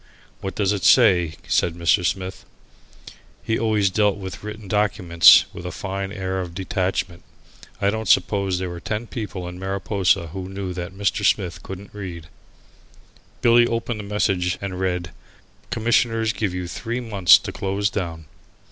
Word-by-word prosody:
"What 95 - -5
does 105 -1 +1
it 100 -3 -4
say?" 95 -7 +5
said 85 -1 +1
Mr. 85 +1 +2
Smith. 95 +2 -3 1.0
He 110 - -1
always 105 -4 +2
dealt 105 0 +2
with 95 -1 -8
written 105 -1 -7
documents 95 -5 +5
with 85 - -8
a 90 - -4
fine 95 0 -4
air 95 -1 -3
of 85 -2 -7
detachment. 90 -1 -2 0.6
I 100 - +2
don't 110 0 -4
suppose 95 -1 +2
there 90 -1 -3
were 85 - -7
ten 105 +6 -4
people 105 -6 -6
in 90 0 -8
Mariposa 95 -2 0
who 95 -1 -6
knew 95 -1 -5
that 90 +2 -6
Mr. 100 +1 0
Smith 95 -3 +1
couldn't 95 +1 -9
read. 90 -5 -8 1.1
Billy 120 0 +6
opened 115 -1 -2
the - - -5
message 95 -3 0
and 95 -2 -5
read, 90 -2 -2 0.6
"Commissioners 115 -1 +1
give 105 -3 -2
you 90 0 -4
three 120 +7 -4
months 105 -7 +5
to - - -6
close 100 +1 -1
down." 85 -5 -4
95 Hz, 155 wpm, -22 LUFS, 90-105 Hz, 1.1 s, Billy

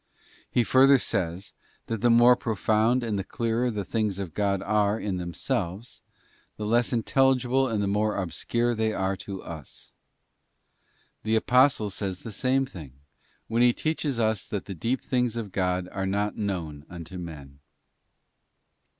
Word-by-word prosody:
He 120 - +2
further 135 +4 +6
says, 95 -5 -2 0.3
that 115 -3 -4
the 120 - +4
more 120 +1 +7
profound 110 +2 +1
and 110 -4 -1
the - - -2
clearer 115 +4 -1
the 105 -4 -3
things 105 -2 -1
of 95 -5 -5
God 100 -2 0
are 105 +1 +1
in 100 -3 -2
themselves, 90 +4 -3 0.6
the 105 - -4
less 120 +3 +2
intelligible 130 +1 +2
and 110 -4 -1
the - - 0
more 105 +2 0
obscure 120 +6 -1
they 110 -1 0
are 95 -1 -1
to 95 -1 -7
us. 80 -5 -9 1.3
The 110 +1 0
Apostle 125 -2 +3
says 95 -2 -4
the 115 - -6
same 130 +5 +1
thing, 80 - -10 0.5
when 115 +1 +1
he 120 0 +5
teaches 150 -4 -2
us 110 -4 0
that 100 -3 -4
the 100 - -6
deep 115 +10 -1
things 125 -3 0
of 110 -4 -4
God 90 -1 0
are 95 0 -2
not 100 +2 -1
known 85 -8 -4
unto 90 +1 -8
men. 70 -5 -9
105 Hz, 155 wpm, -26 LUFS, 95-120 Hz, 1.3 s, more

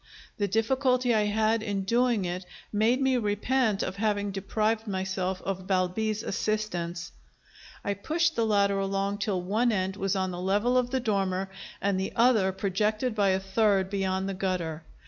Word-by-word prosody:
The 205 - +1
difficulty 250 +3 +2
I 215 -1 +3
had 220 +2 +1
in 200 -3 -2
doing 235 -1 +2
it 180 +1 -3 0.3
made 225 +5 +3
me 265 -1 +3
repent 215 0 +1
of 190 +1 -4
having 205 -1 0
deprived 215 +3 -1
myself 190 -1 -2
of 190 -1 -4
Balbi's 205 +4 0
assistance. 180 -5 -2 0.7
I 200 - +1
pushed 320 - 0
the 230 - +1
ladder 200 -2 +2
along 195 +1 -1
till 195 -4 -1
one 220 +6 +1
end 190 -1 -1
was 195 0 0
on 190 -1 0
the 175 0 -5
level 205 +7 +1
of 250 -1 +2
the 260 +1 0
dormer 195 -4 -1 0.3
and 200 -1 +1
the 190 - -3
other 230 -5 +4
projected 210 +5 0
by 205 -2 +2
a 190 0 +2
third 195 -1 +1
beyond 190 -1 -1
the 195 - -2
gutter. 180 -4 -2
200 Hz, 165 wpm, -28 LUFS, 190-220 Hz, 0.7 s, other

